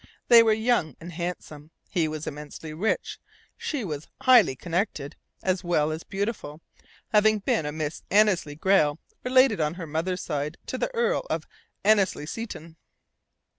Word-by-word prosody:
They 235 -1 +10
were 225 -1 +4
young 220 -7 +1
and 170 +2 -9
handsome. 160 -3 -6 0.2
He 170 -4 0
was 155 0 -5
immensely 150 +1 -7
rich, 195 +8 -1 0.4
she 280 -8 -3
was 150 -3 -5
"highly 245 - +6
connected" 165 -3 -3 0.3
as 185 0 0
well 155 -3 +1
as 160 +1 -4
beautiful, 195 -7 -4 0.5
having 215 0 +4
been 165 -6 0
a - - -2
Miss 155 0 -4
Annesley 195 -7 +3
Grayle, 155 -3 +3 0.3
related 255 -6 +4
on 150 +2 0
her 180 -2 -6
mother's 165 +4 -2
side 150 +1 -3
to - - -4
the - - 0
Earl 475 +1 +1
of - - -2 0.4
Annesley 200 -7 +3
Seton. 165 -4 -7
175 Hz, 150 wpm, -26 LUFS, 155-215 Hz, 0.5 s, They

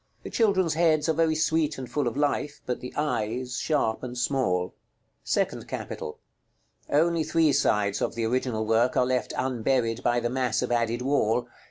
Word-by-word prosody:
The - - -7
children's 190 -7 +2
heads 155 -2 +2
are - - +4
very 160 0 +2
sweet 155 -1 +1
and 130 -1 -6
full 140 +2 -1
of 115 - -3
life, 145 0 0
but 125 - -2
the 125 - -7
eyes 125 -3 -2
sharp 140 -8 0
and 125 -1 -6
small. 120 -9 0
§ - - -28
LXVIII. - - -37 0.5
SECOND - - -1
CAPITAL. 75 - -6 0.7
Only 165 +2 +2
three 155 -1 +2
sides 105 -7 +1
of - - -1
the 115 -1 -1
original 120 -2 -1
work 115 +3 +2
are 125 - +4
left 125 -1 -1
unburied 125 -2 0
by 120 0 +2
the 120 0 -2
mass 125 -3 0
of - - -3
added 120 0 0
wall. 125 -3 +1
125 Hz, 185 wpm, -26 LUFS, 120-150 Hz, 0.7 s, are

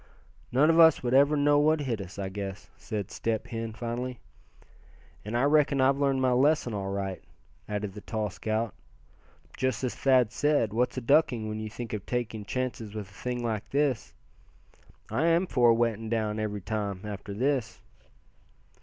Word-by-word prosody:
"None 145 +6 +5
of 165 - +3
us 160 -5 +7
would 120 0 0
ever 140 +3 +5
know 145 0 +4
what 155 +1 +3
hit 120 -7 -2
us, 95 +1 -9
I 95 -1 -3
guess," 100 0 -6
said 105 -5 -5
Step 115 -2 -2
Hen, 115 -1 -4
finally. 120 +2 -4 1.1
"And 110 +3 -2
I 120 - +2
reckon 145 -1 +3
I've 135 +1 +3
learned 135 -2 +1
my 130 - +3
lesson 130 -1 +2
all 100 -1 -3
right," 95 -2 -3 0.5
added 105 -2 -3
the 105 - -9
tall 110 -2 -3
scout. 110 +2 -2 0.8
"Just 130 -2 -1
as 125 - -1
Thad 130 -5 +3
said, 145 -7 +1
what's 125 +3 0
a - - -1
ducking, 120 -3 +3
when 110 0 -4
you 110 0 -5
think 115 +1 -7
of 105 -3 -3
taking 115 -4 -3
chances 120 -4 -4
with 105 -3 -6
a - - -19
thing 125 +2 -4
like 110 -3 -3
this? 140 -4 0 1.0
I 160 +4 +1
am 170 +2 +3
for 125 -8 +3
a - - +7
wetting 115 -1 0
down, 110 -2 -1
every 105 -1 -3
time, 100 -2 -3
after 100 -1 -6
this." 130 0 -1
115 Hz, 180 wpm, -28 LUFS, 105-135 Hz, 1.1 s, us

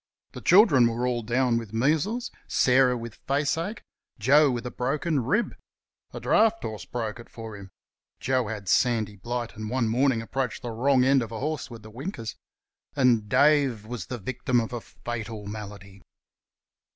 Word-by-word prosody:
The - - -9
children 165 - +6
were 115 +2 -1
all 125 -1 0
down 120 +1 +1
with 110 -2 -9
measles, 160 - 0 0.2
Sarah 125 -1 +3
with 115 -1 -8
face 140 +1 +1
ache, 195 +7 -4 0.3
Joe 140 +7 +5
with 120 -2 -3
a 125 - -4
broken 145 +2 -1
rib 210 - 0 0.6
a - - -7
draught 225 +1 +3
horse 110 -1 -5
broke 115 -2 -4
it 120 - -12
for 115 -2 -8
him 100 -1 -10 0.5
(Joe 130 -3 0
had 105 -3 -6
sandy 110 -1 +2
blight, 120 +4 -4
and 110 0 -5
one 125 -1 0
morning 120 0 +2
approached 130 +1 -3
the 120 - -4
wrong 130 +3 +3
end 135 0 +4
of 115 -1 -5
a 110 - -5
horse 150 -1 -3
with 115 -3 -10
the 110 - -11
winkers), 120 - -6 0.6
and 120 -6 +3
Dave 140 -6 +3
was 120 +1 -6
the 125 - -4
victim 125 +2 -1
of 115 +1 -3
a 120 - -4
fatal 110 -3 -6
malady. 100 -2 -9
120 Hz, 175 wpm, -26 LUFS, 110-135 Hz, 0.6 s, children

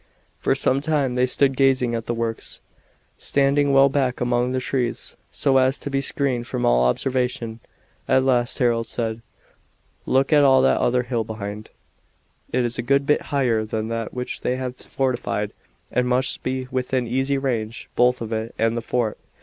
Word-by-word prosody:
For - - +1
some 135 +2 +1
time 145 -4 0
they 125 +1 +2
stood 135 +1 +2
gazing 130 -3 +2
at 115 -1 -3
the 120 - -1
works, 115 -1 -4 0.6
standing 140 +1 +2
well 135 0 +6
back 135 -2 0
among 125 0 +1
the 130 - 0
trees, 125 -1 -2 0.2
so 135 -2 +2
as 130 +1 +3
to 140 - -5
be 135 0 +1
screened 130 -4 -1
from 125 0 -2
all - - +4
observation. 125 - -1 0.5
At 130 - +3
last 125 -2 +1
Harold 115 -2 +1
said: 115 -1 -3 0.9
"Look 135 +3 +2
at 150 - +6
that 135 -1 +5
other 125 +1 +2
hill 120 -2 -1
behind. 105 -1 -7 0.8
It 125 0 +1
is 120 +1 -4
a - - +2
good 140 +3 +2
bit 150 - +2
higher 125 -7 +1
than 110 0 -3
that 115 -1 -3
which 125 0 -5
they 125 - 0
have 130 -1 -4
fortified 120 -7 -2 0.4
and 125 0 +1
must 125 +1 +1
be 130 0 -3
within 130 0 -1
easy 135 +4 0
range 115 -5 -3
both 125 0 +3
of 115 0 -4
it 110 +1 -4
and 115 +1 +1
the 120 - -2
fort. 115 -2 -1
125 Hz, 175 wpm, -23 LUFS, 115-135 Hz, 0.9 s, well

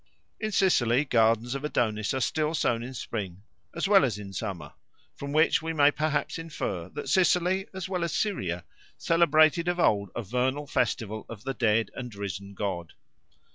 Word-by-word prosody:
In 215 0 -2
Sicily 140 - +3
gardens 115 -1 +2
of 140 +1 -4
Adonis 110 -7 0
are 130 - -1
still 155 +6 0
sown 115 -6 +1
in 130 +2 -7
spring 100 -5 -5 0.3
as 170 +3 -1
well 195 -2 +6
as 115 -7 0
in 100 -2 -8
summer, 90 -9 -5 0.4
from 140 0 -6
which 155 +3 +3
we 165 0 -3
may 145 -2 +5
perhaps 150 0 -1
infer 100 - -4
that - - -7
Sicily 185 +1 +2
as 190 -2 -5
well 180 -2 -2
as 170 - -1
Syria 90 - -1 0.3
celebrated 165 0 +4
of 175 0 0
old 100 - +2
a 120 - -3
vernal 130 +7 -1
festival 110 -5 -1
of 115 -2 -9
the 135 - -2
dead 115 -3 +1
and 125 -4 -7
risen 100 0 -6
god. 90 -5 -4
125 Hz, 175 wpm, -27 LUFS, 105-165 Hz, 0.4 s, well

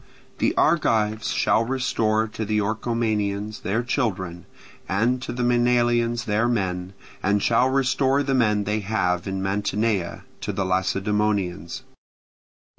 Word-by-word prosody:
The - - +1
Argives 110 -1 +2
shall 110 - +2
restore 115 -3 0
to 110 0 -5
the 105 0 0
Orchomenians 110 -1 -1
their 110 +5 -1
children, 95 - -2 0.4
and 120 +6 +1
to - - -5
the 125 0 -2
Maenalians 120 -1 +2
their 110 +2 +1
men, 95 -5 -2 0.3
and 100 +1 +1
shall 125 +2 +3
restore 135 +1 +2
the 135 -1 -1
men 105 -5 +2
they 105 +2 -1
have 90 -4 -1
in 95 0 -3
Mantinea 100 -1 -1 0.2
to - - -2
the 100 - -2
Lacedaemonians. 95 -1 -1
110 Hz, 125 wpm, -24 LUFS, 100-120 Hz, 0.4 s, shall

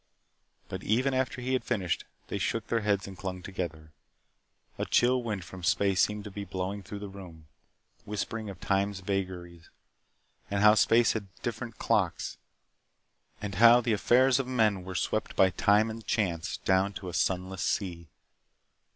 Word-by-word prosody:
But - - -6
even 130 +6 +1
after 130 -1 -1
he 130 +1 -1
had 130 - +1
finished, 95 -8 -1 0.2
they - - -4
shook - - -1
their 115 - 0
heads 100 -2 0
and 95 - -8
clung 90 -1 -5
together. 80 -5 -6 0.9
A - - 0
chill 125 +1 +3
wind 105 -7 -4
from 90 +2 -10
space 95 +2 +2
seemed 105 0 0
to 105 - -8
be 100 +1 -5
blowing 95 +1 -4
through 100 +2 -8
the 100 0 -6
room, 90 -5 -11 0.6
whispering 105 +1 -4
of 95 -3 -9
time's 100 0 0
vagaries, 90 -3 -4 0.8
and 100 0 0
how 105 0 +8
space 115 +3 +4
had 105 -3 -4 0.2
different 115 -1 -4
clocks, - - 0 1.0
and 100 -1 -3
how 120 +1 +9
the 120 -2 0
affairs 125 +5 +4
of 135 - -2
men 110 -7 +2
were 95 0 -7
swept - - -1
by 95 -1 +5
time 105 +4 +3
and 115 0 -8
chance 85 -7 -1
down 95 +1 +1
to 95 - -7
a - - -8
sunless 95 +1 -1
sea. 85 -4 -2
100 Hz, 165 wpm, -29 LUFS, 95-115 Hz, 1.0 s, how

